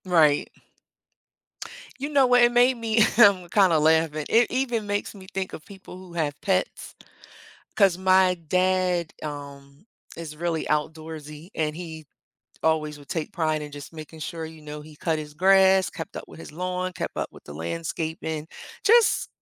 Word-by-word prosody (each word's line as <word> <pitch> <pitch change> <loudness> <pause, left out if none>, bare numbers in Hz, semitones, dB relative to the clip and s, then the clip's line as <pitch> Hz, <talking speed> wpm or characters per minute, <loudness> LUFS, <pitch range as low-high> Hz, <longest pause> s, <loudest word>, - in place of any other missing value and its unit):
Right. 160 -5 +4 1.5
You 280 +2 -3
know 280 -3 +4
what, 245 0 +5
it 240 0 +6
made 245 +1 +4
me, 225 -1 +1 0.2
um, 200 -6 +6
kinda 185 -5 +4
laughing, 155 -1 +2
it 235 +1 +4
even 240 -4 -1
makes 205 0 -2
me 190 -2 -13
think 190 -1 -3
of 155 - -9
people 190 -2 -12
who 185 -2 -12
have 150 -4 -2
pets, 185 -2 -1 0.8
'cause 195 -4 +4
my 185 0 +4
dad, 185 -1 +1
um, 140 +2 -9 0.3
is 160 -2 -7
really 165 0 -2
outdoorsy, 155 +1 -4
and 155 -1 -1
he 160 -3 -8 0.6
always 155 -2 0
would 145 -2 -16
take 160 -3 -3
pride 155 -2 0
in 150 -1 -8
just 145 +1 -9
making 160 0 -10
sure, 165 +1 -5
you 160 0 -10
know, 150 0 -8
he 155 0 -13
cut 160 +1 -1
his 150 -1 -8
grass, 190 +2 +5
kept 165 - -8
up - - -6
with - - -13
his 165 - -10
lawn, 180 +2 -3
kept - - -5
up - - -2
with - - -15
the 75 - -10
landscaping, 150 - -4 0.4
just 460 +1 +4
165 Hz, 165 wpm, -25 LUFS, 155-190 Hz, 1.5 s, it